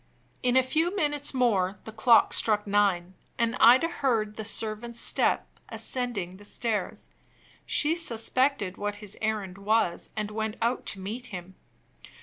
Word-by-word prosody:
In 250 Hz, 0 st, +3 dB
a 260 Hz, -, +6 dB
few 320 Hz, +8 st, 0 dB
minutes 295 Hz, -5 st, +1 dB
more 210 Hz, -7 st, +1 dB
the 220 Hz, -, -8 dB
clock 225 Hz, +2 st, +4 dB
stuck 210 Hz, -2 st, +2 dB
nine; 200 Hz, -3 st, +1 dB, 0.2 s
and 235 Hz, -1 st, +1 dB
Ida 250 Hz, +7 st, +7 dB
heard 230 Hz, -10 st, -1 dB
the 220 Hz, -, -5 dB
servant's 225 Hz, +2 st, -3 dB
step -, -, +1 dB, 0.2 s
ascending 210 Hz, -8 st, -3 dB
the 205 Hz, -, -15 dB
stairs. 210 Hz, -1 st, -3 dB, 0.6 s
She 305 Hz, +2 st, +2 dB
suspected 255 Hz, -, 0 dB
what 205 Hz, 0 st, -3 dB
his 205 Hz, -1 st, -7 dB
errand 210 Hz, -4 st, -2 dB
was, 210 Hz, -3 st, 0 dB
and 210 Hz, -1 st, -2 dB
went 220 Hz, 0 st, -3 dB
out 235 Hz, +2 st, -1 dB
to 195 Hz, -, -2 dB
meet 225 Hz, +6 st, -6 dB
him. 185 Hz, -2 st, -8 dB
220 Hz, 145 wpm, -27 LUFS, 205-250 Hz, 0.6 s, Ida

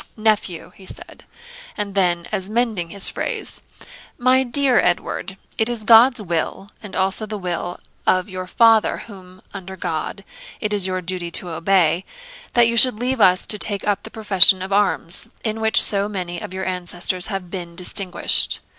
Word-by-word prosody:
'Nephew,' 215 Hz, -6 st, -1 dB
he 190 Hz, -, -15 dB
said; -, -, -9 dB, 0.5 s
and 205 Hz, -2 st, -4 dB
then, 175 Hz, -3 st, 0 dB
as 195 Hz, -2 st, -3 dB
mending 220 Hz, -7 st, -1 dB
his 200 Hz, +2 st, +4 dB
phrase, -, -, -4 dB, 0.6 s
'My 255 Hz, +1 st, +3 dB
dear 265 Hz, 0 st, +2 dB
Edward, 180 Hz, +2 st, -2 dB, 0.2 s
it 220 Hz, +1 st, +1 dB
is 235 Hz, -3 st, -3 dB
God's 235 Hz, +3 st, +6 dB
will, 175 Hz, +1 st, -4 dB
and 210 Hz, -, -10 dB
also 195 Hz, +3 st, -1 dB
the 210 Hz, 0 st, -5 dB
will 175 Hz, -1 st, -4 dB, 0.3 s
of 185 Hz, +1 st, +2 dB
your 185 Hz, -2 st, -7 dB
father, 225 Hz, +2 st, +3 dB
whom, 185 Hz, -3 st, -14 dB
under 190 Hz, -1 st, -9 dB
God, 165 Hz, +3 st, -5 dB, 0.4 s
it 210 Hz, 0 st, -3 dB
is 200 Hz, -2 st, +2 dB
your 185 Hz, -1 st, -3 dB
duty 175 Hz, -1 st, -4 dB
to 175 Hz, +1 st, -3 dB
obey, 170 Hz, 0 st, +1 dB, 0.5 s
that 240 Hz, -1 st, +5 dB
you 230 Hz, -, 0 dB
should 230 Hz, -2 st, +7 dB
leave 250 Hz, 0 st, -1 dB
us 185 Hz, -2 st, +4 dB
to 210 Hz, -, -4 dB
take 200 Hz, -1 st, -2 dB
up 200 Hz, -1 st, 0 dB
the 220 Hz, -, -10 dB
profession 195 Hz, -4 st, +5 dB
of 190 Hz, +1 st, -5 dB
arms, 195 Hz, -4 st, +3 dB
in 220 Hz, 0 st, -3 dB
which 220 Hz, 0 st, +4 dB
so 200 Hz, 0 st, +4 dB
many 180 Hz, -4 st, -5 dB
of -, -, -8 dB
your 190 Hz, 0 st, -5 dB
ancestors 180 Hz, 0 st, -2 dB
have 195 Hz, -4 st, -6 dB
been 175 Hz, -3 st, -7 dB
distinguished. 185 Hz, +1 st, 0 dB
195 Hz, 175 wpm, -20 LUFS, 180-215 Hz, 0.6 s, should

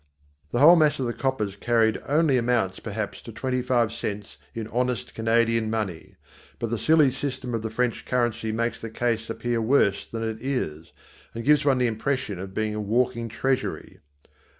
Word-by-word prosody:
The -, -, -1 dB
whole 155 Hz, +7 st, +8 dB
mass 155 Hz, -3 st, +3 dB
of 130 Hz, -, 0 dB
the 120 Hz, -, -2 dB
coppers 115 Hz, -8 st, -2 dB
carried 110 Hz, +1 st, +2 dB
only 150 Hz, -1 st, +3 dB
amounts 115 Hz, -6 st, +1 dB
perhaps -, -, -5 dB
to -, -, -9 dB
twenty 130 Hz, -1 st, -2 dB
five 120 Hz, -3 st, +1 dB
cents 105 Hz, -3 st, -5 dB, 0.2 s
in 115 Hz, -2 st, -4 dB
honest 125 Hz, -1 st, -1 dB
Canadian 115 Hz, 0 st, +2 dB
money. 105 Hz, -7 st, -4 dB, 0.4 s
But 115 Hz, -1 st, -3 dB
the 115 Hz, -, -1 dB
silly 155 Hz, -4 st, +4 dB
system 130 Hz, -2 st, -4 dB
of 115 Hz, -, -1 dB
the 110 Hz, -, -3 dB
French 125 Hz, +1 st, -1 dB
currency 120 Hz, -3 st, -1 dB
makes 115 Hz, +2 st, -2 dB
the 115 Hz, -, -5 dB
case 115 Hz, 0 st, -1 dB
appear 120 Hz, 0 st, -1 dB
worse 110 Hz, -4 st, +2 dB
than 115 Hz, 0 st, -4 dB
it 110 Hz, 0 st, -5 dB
is, 85 Hz, -, -3 dB, 0.4 s
and 115 Hz, -, -4 dB
gives 150 Hz, 0 st, +4 dB
one 135 Hz, -2 st, +4 dB
the 125 Hz, -, +2 dB
impression 115 Hz, -3 st, -2 dB
of 95 Hz, 0 st, -7 dB
being 110 Hz, -1 st, -1 dB
a 105 Hz, -, -3 dB
walking 115 Hz, +2 st, 0 dB
treasury. 130 Hz, +3 st, -2 dB
115 Hz, 180 wpm, -25 LUFS, 110-130 Hz, 0.4 s, whole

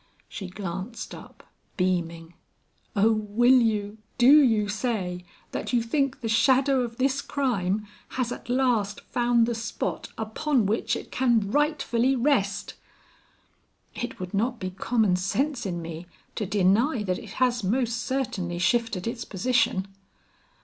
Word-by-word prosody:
She 195 Hz, -, -7 dB
glanced 190 Hz, +4 st, -6 dB
up -, -, -12 dB, 0.3 s
beaming. 170 Hz, -3 st, -1 dB, 0.6 s
"Oh, 215 Hz, +2 st, +4 dB
will 225 Hz, +4 st, +4 dB
you, 215 Hz, -2 st, -1 dB, 0.2 s
do 270 Hz, +5 st, +8 dB
you 220 Hz, -6 st, +3 dB
say, 200 Hz, -5 st, -2 dB, 0.3 s
that -, -, -4 dB
you 235 Hz, -2 st, +3 dB
think 275 Hz, +3 st, -1 dB
the 230 Hz, -, -2 dB
shadow 260 Hz, +4 st, +3 dB
of 235 Hz, -1 st, -4 dB
this 270 Hz, +1 st, +1 dB
crime 215 Hz, -9 st, -1 dB, 0.3 s
has 250 Hz, -2 st, 0 dB
at -, -, -7 dB
last 245 Hz, -6 st, +1 dB
found 240 Hz, -1 st, +2 dB
the 235 Hz, -, -1 dB
spot 225 Hz, -1 st, -4 dB
upon 225 Hz, +3 st, 0 dB
which 215 Hz, +4 st, 0 dB
it -, -, -8 dB
can 235 Hz, -6 st, +2 dB
rightfully 275 Hz, -3 st, +1 dB
rest?" 240 Hz, -7 st, 0 dB, 1.2 s
"It 240 Hz, -, -5 dB
would 180 Hz, +1 st, -6 dB
not 235 Hz, +4 st, 0 dB
be 185 Hz, -1 st, -4 dB
common 195 Hz, 0 st, +1 dB
sense 250 Hz, +6 st, -1 dB
in 175 Hz, -2 st, -4 dB
me 165 Hz, +1 st, -7 dB, 0.3 s
to 210 Hz, -, -3 dB
deny 210 Hz, -, +2 dB
that 185 Hz, -2 st, -1 dB
it 210 Hz, -, -10 dB
has 245 Hz, -3 st, +1 dB
most 230 Hz, +3 st, 0 dB
certainly 235 Hz, -10 st, -2 dB
shifted 210 Hz, 0 st, +1 dB
its 230 Hz, 0 st, -3 dB
position." 210 Hz, -2 st, +1 dB
225 Hz, 140 wpm, -26 LUFS, 195-250 Hz, 1.2 s, do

